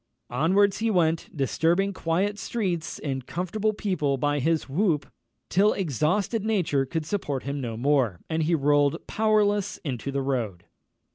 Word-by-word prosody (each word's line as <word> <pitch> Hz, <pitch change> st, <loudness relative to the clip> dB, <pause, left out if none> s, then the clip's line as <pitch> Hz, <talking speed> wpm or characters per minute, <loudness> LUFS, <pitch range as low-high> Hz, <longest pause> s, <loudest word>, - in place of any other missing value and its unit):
Onwards 190 Hz, +10 st, +3 dB
he 225 Hz, +1 st, +1 dB
went, 165 Hz, -5 st, +1 dB
disturbing 170 Hz, +8 st, +1 dB
quiet 190 Hz, +4 st, -1 dB
streets 180 Hz, -9 st, -2 dB
and 135 Hz, -3 st, -4 dB
comfortable 190 Hz, +5 st, -1 dB
people 180 Hz, -10 st, -1 dB
by 145 Hz, +2 st, 0 dB
his 160 Hz, +3 st, 0 dB
whoop, 155 Hz, 0 st, +1 dB, 0.4 s
till 205 Hz, +4 st, +3 dB
exhausted 190 Hz, -, 0 dB
nature 170 Hz, -11 st, +1 dB
could 160 Hz, +2 st, -3 dB
support 150 Hz, -7 st, -2 dB
him 140 Hz, 0 st, -3 dB
no 115 Hz, -3 st, -4 dB
more, 125 Hz, -, +1 dB
and 160 Hz, 0 st, -1 dB
he 165 Hz, +2 st, +2 dB
rolled 145 Hz, -1 st, +2 dB
powerless 210 Hz, -2 st, +1 dB
into 140 Hz, -2 st, -3 dB
the 135 Hz, 0 st, -1 dB
road. 115 Hz, -10 st, -2 dB
160 Hz, 145 wpm, -26 LUFS, 140-200 Hz, 0.4 s, Onwards